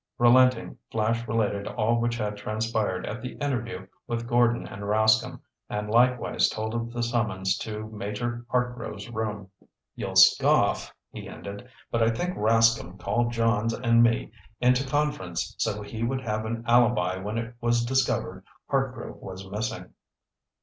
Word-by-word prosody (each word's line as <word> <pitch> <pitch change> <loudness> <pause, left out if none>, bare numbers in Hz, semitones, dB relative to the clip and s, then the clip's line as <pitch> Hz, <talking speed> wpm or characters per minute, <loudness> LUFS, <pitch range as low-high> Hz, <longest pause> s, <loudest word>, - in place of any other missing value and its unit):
Relenting, 125 +1 +4
Flash 115 +1 0
related 105 -2 0
all 115 +1 +1
which 120 0 0
had 105 -2 -2
transpired 105 -2 -2
at 120 +4 -5
the 125 - -6
interview 120 -9 -3 0.2
with 120 -1 -3
Gordon 120 0 +2
and 100 - -9
Rascomb, 110 +2 +2 0.3
and 105 0 -3
likewise 125 +1 +3
told 110 +1 -4
of 115 0 -3
the 120 0 -2
summons 105 -5 0
to 110 0 -5
Major 110 +3 -4
Hartgrove's 125 -4 -2
room. 105 -4 -4 0.4
"You'll - - -5
scoff," - - +5 0.2
he - - -8
ended, 100 +5 -9 0.2
"but 115 - 0
I 115 - +4
think 175 +11 -2
Rascomb 110 -3 +3
called 120 +5 0
Johns 115 -1 +1
and 115 -1 +3
me 115 -2 +2 0.3
into 125 +2 +2
conference 145 - -1
so 105 -2 -1
he 110 +2 -7
would 130 +3 -1
have 110 -3 -2
an 115 +1 -4
alibi 120 -7 +3
when 105 +4 -4
it 115 +1 -4
was 120 0 +2
discovered 120 -7 0 0.3
Hartgrove 130 -3 -2
was 95 0 -9
missing." 110 +2 -4
115 Hz, 150 wpm, -26 LUFS, 105-120 Hz, 0.4 s, scoff